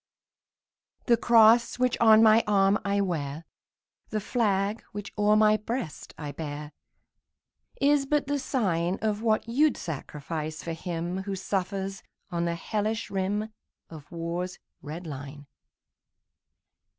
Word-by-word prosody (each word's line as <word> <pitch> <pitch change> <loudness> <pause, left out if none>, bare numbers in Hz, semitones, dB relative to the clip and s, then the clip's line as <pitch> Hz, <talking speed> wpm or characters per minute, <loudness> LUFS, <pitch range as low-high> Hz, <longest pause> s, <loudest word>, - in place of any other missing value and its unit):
The 240 - +5
cross 230 0 +5
which 250 -1 +2
on 220 -1 +7
my 220 +1 +6
arm 195 0 +3
I 200 0 +1
wear, 160 -4 -3 0.6
The 215 - -1
flag 210 -1 0
which 205 0 -7
o'er 210 0 +3
my 215 0 +5
breast 215 - -5
I 150 -2 -5
bear, 150 0 -6 1.1
Is 280 0 +3
but 295 0 +1
the 285 +1 -1
sign 185 - 0
Of 215 -1 0
what 220 -1 +1
you 285 +7 +4
'd - - -7
sacrifice 155 0 -5
for 165 - -4
him 170 +1 -4
Who 195 0 -4
suffers 195 0 -3 0.3
on 170 -1 -1
the 170 0 -1
hellish 215 +5 -2
rim 200 +3 -1 0.4
Of 155 -3 -11
war's 170 +2 -4 0.2
red 160 +4 -7
line. 145 -1 -8
195 Hz, 130 wpm, -27 LUFS, 165-220 Hz, 1.1 s, on